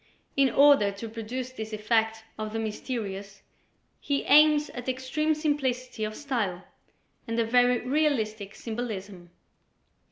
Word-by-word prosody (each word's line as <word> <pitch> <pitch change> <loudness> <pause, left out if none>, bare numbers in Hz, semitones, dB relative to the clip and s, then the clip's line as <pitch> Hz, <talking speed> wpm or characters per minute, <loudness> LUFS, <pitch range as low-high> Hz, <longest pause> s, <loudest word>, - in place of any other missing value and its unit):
In 275 -1 +4
order 275 -5 +5
to 200 +3 -7
produce 235 +3 -5
this 220 -3 -7
effect 220 +1 0
of 215 0 -5
the - - -2
mysterious 205 -3 -5 0.6
he 280 -1 -1
aims 300 0 +5
at 245 +1 -5
extreme 275 +5 0
simplicity 260 -6 -1
of 215 0 -5
style 220 -11 -2 0.6
and 230 0 -2
a 230 - +2
very 245 +1 +3
realistic 225 -8 0
symbolism. 205 -6 -6
230 Hz, 125 wpm, -27 LUFS, 215-265 Hz, 0.6 s, order